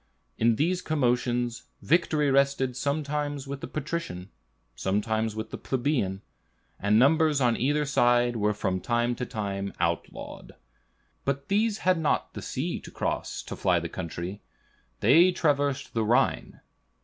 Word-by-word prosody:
In 115 0 +3
these 175 +8 +1
commotions, 125 -5 0 0.2
victory 155 -3 +2
rested 135 -2 +2
sometimes 145 0 -2
with 140 0 -6
the - - -5
patrician, 145 - -5 0.4
sometimes 110 - -1
with 110 0 -5
the - - -6
plebeian, 120 -8 -1 0.6
and 105 +2 +3
numbers 150 +3 +4
on 120 -3 +3
either 145 +4 +1
side 120 -3 +3
were 105 -1 +1
from 95 -3 -1
time 120 +2 +1
to 125 0 -4
time 100 -3 -3
outlawed. 85 0 -3 0.7
But 140 0 -2
these 210 +1 +2
had 185 -2 +4
not 155 - 0
the - - -6
sea - - -3
to - - -11
cross - - -3
to - - -6
fly 90 -2 +2
the 85 0 -5
country; 90 +3 -5 0.6
they 175 +3 +6
traversed 145 -4 0
the 115 - +1
Rhine. 115 +3 +1
125 Hz, 140 wpm, -27 LUFS, 110-145 Hz, 0.7 s, they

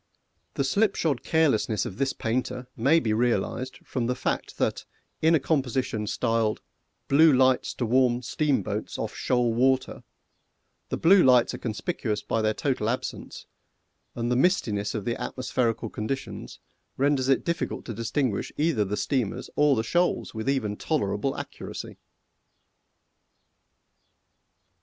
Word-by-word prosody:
The - - +1
slipshod 165 - +1
carelessness 125 - +1
of 95 - -7
this 135 -1 +1
painter 125 +2 -2
may 140 +8 +4
be 110 -7 0
realised 125 +2 -1
from 120 -3 -2
the 125 - 0
fact - - -3
that - - -1 0.4
in 160 +1 +5
a - - +3
composition 130 -6 -1
styled 115 -1 0 0.5
"Blue 155 +3 +6
Lights 130 -1 +3
to 125 - -1
Warn 125 +1 +2
Steamboats 125 -6 -1
off - - -4
Shoal 125 -2 +1
Water," 130 +2 +1 0.9
the - - -2
blue 185 +3 +6
lights 125 -2 +5
are - - -6
conspicuous 110 - -3
by 115 - -1
their 110 0 +1
total 130 -6 -1
absence, 125 - -5 0.7
and 120 +1 -2
the - - +2
mistiness 115 - +1
of 105 - -4
the 120 - -2
atmospherical 120 -3 -2
conditions 135 +5 -5 0.4
renders 135 -1 +2
it 135 - +2
difficult 170 0 -2
to 115 - -5
distinguish 115 +1 -1
either 150 -8 +2
the 105 +1 -3
steamers 125 -2 -2
or 150 -1 +4
the 110 - 0
shoals 175 +9 0
with 110 +3 -3
even 110 -7 -1
tolerable - - -1
accuracy! - - -7
125 Hz, 135 wpm, -26 LUFS, 115-140 Hz, 0.9 s, Blue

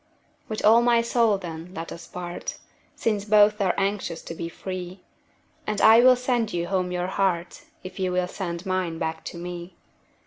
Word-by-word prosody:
With 215 -1 -3
all 225 +2 +7
my 235 -1 +3
soul, 230 -3 +2
then, 175 0 -8
let 165 -1 -6
us 170 - -9
part, 175 -1 -6 0.4
Since 210 -3 0
both 210 0 +4
are 185 -2 +2
anxious 195 -4 -2
to - - -7
be 165 0 -5
free; 185 +1 -7 0.7
And 210 -1 -1
I 225 +1 +8
will 255 +1 +7
sand 245 -3 0
you 170 -1 -1
home 185 -2 0
your 180 0 -1
heart, 185 -2 -1 0.2
If 185 +1 -9
you 185 -1 0
will 180 0 0
send 175 -1 -5
mine 185 -3 -1
back 160 0 -3
to - - -6
me. 175 0 -7
185 Hz, 180 wpm, -25 LUFS, 175-210 Hz, 0.7 s, I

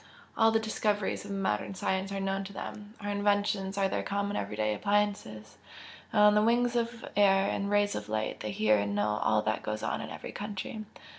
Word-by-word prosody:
All 225 - +5
the 225 0 +3
discoveries 210 -2 -1
of - - -9
our 200 - -3
modern 190 - -1
science 190 +1 -1
are 195 - -2
known 195 0 -1
to 200 - -9
them 205 +2 -8
our 205 0 -2
inventions 205 -1 +1
are 195 -1 +3
their - - -1
common 200 0 -2
everyday 105 +1 -1
appliances 200 - -1 0.5
and 210 - +3
on 210 0 +7
the 210 - +4
wings 240 +2 +2
of 235 0 -1
air 195 -1 +5
and 200 0 -2
rays 205 0 +2
of 105 0 -5
light 110 0 -2
they 105 - -4
hear 110 0 +3
and 100 0 -1
know 105 +1 +1
all 110 -1 +2
that 110 0 0
goes 110 0 -4
on - - -1
in - - -6
every - - -7
country. 210 +1 -5
200 Hz, 210 wpm, -30 LUFS, -, 0.5 s, on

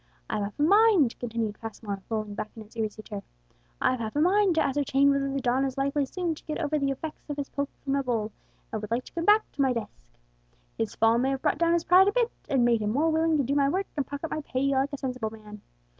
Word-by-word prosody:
I've 215 - -1
half 200 +1 -4
a - - +3
mind," 395 - +5
continued 225 -3 -3
Passmore, 210 -3 -6
lolling 215 -2 -2
back 210 +1 -4
in 220 - -8
his 215 +2 -20
easy 215 -1 -3
chair, 205 -2 -6 0.6
"I've 255 - +1
half 220 +1 -4
a - - +1
mind 375 +2 +4
to - - +3
ascertain 280 0 +2
whether 275 0 0
the 275 - -1
don 255 +1 +1
is 270 -1 -2
likely 275 +1 0
soon 350 +2 -2
to 310 - -13
get 305 - -3
over 305 -1 0
the 275 -1 0
effects 300 +3 -6
of 290 - -3
his 285 -1 -4
poke 280 0 -2
from 275 - -1
the 280 - +2
bull, 230 -5 -1 0.4
and 220 - -2
would 210 - -6
like 235 +2 0
to - - -14
come 335 0 -2
back 425 +1 +6
to 280 - 0
his 260 -2 +2
desk. 210 - -6 0.7
His 110 - -3
fall 225 +1 +4
may 260 +2 +1
have 270 -1 -2
brought 300 -1 +1
down 335 0 +3
his 340 -1 +2
pride 370 +2 +6
a - - +4
bit, 480 +1 +1 0.2
and 260 -3 +3
made 235 -2 +3
him 210 - 0
more 300 +8 +2
willing 320 0 +2
to 280 - +2
do 265 +3 -1
my 280 -1 +3
work 380 +6 0
and 285 -3 -1
pocket 285 +3 -5
my 310 - -2
pay, 275 -1 -1
like 275 +1 +1
a 285 - -4
sensible 255 -4 -3
man. 210 -1 -12
275 Hz, 265 wpm, -27 LUFS, 225-305 Hz, 0.7 s, back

